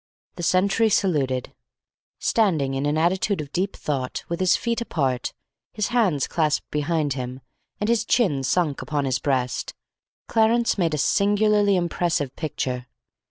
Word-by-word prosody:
The 175 - -6
sentry 195 +6 +3
saluted. 140 - 0 0.6
Standing 160 -12 +1
in 135 +2 -1
an 150 +1 +1
attitude 185 +3 +1
of 145 -2 -6
deep 190 +4 -1
thought, 135 -4 -3
with 170 - -2
his 185 -1 +3
feet 235 0 -2
apart, 135 - -1 0.4
his 210 0 -1
hands 205 - +2
clasped 155 -3 -1
behind 150 -1 0
him, 130 -1 -5 0.4
and 210 - -1
his 230 -1 +2
chin 195 - +2
sunk 145 +2 0
upon 145 -2 -2
his 130 -1 0
breast, 130 -3 -1 0.5
Clarence 230 +1 +3
made 165 -5 +1
a - - -2
singularly 205 +3 +3
impressive 170 -5 -1
picture. 125 -5 -3
165 Hz, 145 wpm, -24 LUFS, 140-200 Hz, 0.6 s, sentry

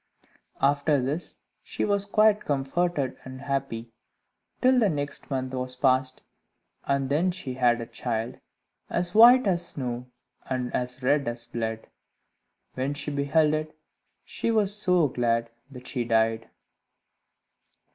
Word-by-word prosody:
After 145 +1 +3
this 140 +7 -2 0.3
she - - -3
was 200 -1 +1
quite 215 0 +3
comforted 140 0 -1
and 130 0 -9
happy, 135 -4 -3 0.7
till 255 0 +4
the 215 -4 +3
next 145 -3 -4
month 130 -1 -3
was 125 0 -2
passed, 130 0 +1 0.6
and 140 -1 0
then 155 +7 +1
she 175 -8 -4
had 125 -2 +2
a 115 - -4
child 115 0 -4 0.5
as 175 0 +1
white 240 +3 +8
as 175 -3 +1
snow 125 -6 -5 0.4
and 125 -2 -2
as 125 +1 -3
red 140 +1 +2
as 120 0 -4
blood. 115 -1 -4 0.9
When 135 +3 -2
she 145 +1 -3
beheld 150 +2 +2
it, 155 0 -3 0.5
she - - -3
was 210 -3 +2
so 180 -6 +3
glad, 115 -2 0 0.2
that 130 -2 -12
she 125 -2 -2
died. 115 0 +1
135 Hz, 135 wpm, -26 LUFS, 125-170 Hz, 0.9 s, white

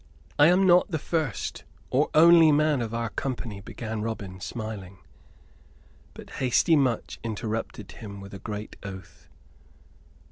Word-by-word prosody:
"I 145 - +8
am 180 +3 +4
not 180 +1 +5
the 160 - -1
first 155 - -3 0.3
or 140 +4 +2
only 165 0 +8
man 150 -2 +2
of 115 -2 -3
our 115 0 -2
company," 115 -6 -4
began 110 +1 -5
Robin, 100 -4 -5
smiling; 105 -3 -6 1.2
but - - -12
hasty 130 +6 +2
Much 130 -6 0
interrupted 110 -2 -4
him 100 -3 -9
with 100 0 -11
a 95 - -7
great 105 +2 -7
oath. 95 -5 -10
115 Hz, 135 wpm, -26 LUFS, 100-150 Hz, 1.2 s, I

